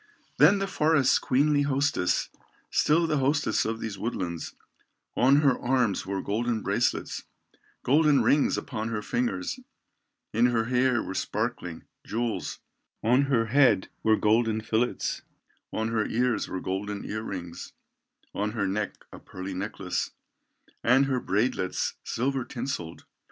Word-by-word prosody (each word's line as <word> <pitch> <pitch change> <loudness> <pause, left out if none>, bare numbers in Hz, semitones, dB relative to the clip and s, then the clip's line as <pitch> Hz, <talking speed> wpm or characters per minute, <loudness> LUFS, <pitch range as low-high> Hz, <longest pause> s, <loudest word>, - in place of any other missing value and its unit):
Then 205 - +7
the 195 - -1
forest's 155 -7 +3
queenly 145 +2 +2
hostess, 140 -9 +1 0.4
Still 165 +3 +3
the 155 -3 +1
hostess 140 -4 +1
of 115 +1 -2
these 105 -4 -5
woodlands, 90 -7 -4 0.6
On 135 +4 +5
her 140 -4 +4
arms 120 -7 +1
wore 95 0 -2
golden 115 +1 -1
bracelets, - - -1 0.6
Golden 150 +1 +4
rings 145 0 +3
upon 110 -5 -4
her 105 -2 -3
fingers, 100 -8 -2 0.7
In 115 +3 +4
her 115 -2 +1
hair 125 -1 +2
were - - -5
sparkling 105 -5 -3 0.2
jewels, 115 +1 -3 0.5
On 125 +5 +4
her 125 -5 +2
head 120 -5 +3
were 110 0 +4
golden 110 +1 +2
fillets, 110 +2 -1 0.5
In 110 +1 -1
her 110 -1 0
ears 120 -2 0
were 95 - -4
golden 100 +2 -3
ear 110 +1 -3
rings, 85 -5 -7 0.6
On 105 +1 -2
her 105 -4 -1
neck 100 +1 -3
a - - -9
pearly 95 +1 -7
necklace, 95 -1 -3 0.7
And 130 +4 +5
her 130 -2 0
braidlets, 100 -3 0
silver 135 +2 -1
tinselled. 120 -11 -5
115 Hz, 135 wpm, -27 LUFS, 105-135 Hz, 0.7 s, Then